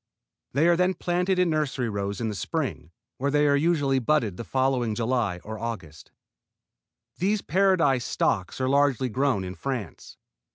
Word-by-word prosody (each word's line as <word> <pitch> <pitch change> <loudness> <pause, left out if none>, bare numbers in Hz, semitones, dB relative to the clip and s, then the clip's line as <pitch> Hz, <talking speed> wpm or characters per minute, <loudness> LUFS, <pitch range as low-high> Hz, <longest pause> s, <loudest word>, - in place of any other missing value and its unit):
They 150 +6 +3
are 175 - +5
then 180 +2 +2
planted 180 +2 0
in 180 -2 +2
nursery 145 -5 -1
rows 100 -2 -3
in 115 - -1
the 110 - -2
spring, 130 - -3 0.3
where 140 +2 0
they 145 +1 +3
are 140 -1 +4
usually 145 -3 +2
budded 120 -6 +1
the 115 - -6
following 130 -3 0
July 115 -5 0
or 110 0 -7
August. 90 -10 -7 1.1
These 200 +3 +1
Paradise 170 -8 +2
stocks 95 +1 -1
are 130 - 0
largely 135 -2 +2
grown 130 -4 0
in 90 0 -5
France. 125 -6 -6
135 Hz, 160 wpm, -26 LUFS, 110-155 Hz, 1.1 s, are